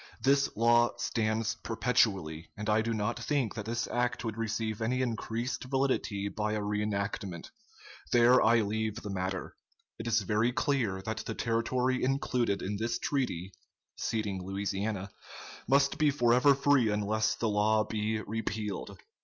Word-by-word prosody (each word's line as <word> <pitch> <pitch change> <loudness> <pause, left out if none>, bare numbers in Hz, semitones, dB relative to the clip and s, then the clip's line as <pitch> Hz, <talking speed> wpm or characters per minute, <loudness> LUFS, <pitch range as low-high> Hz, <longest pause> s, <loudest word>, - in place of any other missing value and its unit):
"This 140 +1 +4
law 120 +1 +4
stands 110 -2 0
perpetually, 95 -10 0
and 105 -1 -5
I 110 +1 +4
do 115 +1 -2
not 105 -2 -1
think 140 -8 0
that 105 - -5
this 115 +1 -1
act 120 0 -1
would 110 -2 -3
receive 110 -1 -2
any 125 +3 +1
increased 120 +1 -3
validity 130 -7 0
by 105 +1 -2
a 110 - 0
reenactment. 105 -3 -3 0.6
There 120 +1 +6
I 115 +1 +5
leave 110 0 -1
the 105 -3 -6
matter. 95 -1 -3 0.4
It 110 - -5
is 115 -2 +2
very 110 +5 +1
clear 115 -10 0
that 110 +1 -3
the - - -4
territory 125 +3 0
included 125 -6 0
in 100 +2 -2
this 115 +2 -1
treaty 100 - -2 0.4
[ceding 105 -4 -2
Louisiana] 100 +1 -3 0.6
must 140 +2 +3
be 155 -1 +4
forever 125 +1 +4
free 140 -4 +3
unless 105 +1 +1
the 115 - -1
law 105 +1 +3
be 110 0 -2
repealed." 105 -2 -4
110 Hz, 145 wpm, -30 LUFS, 105-120 Hz, 0.6 s, There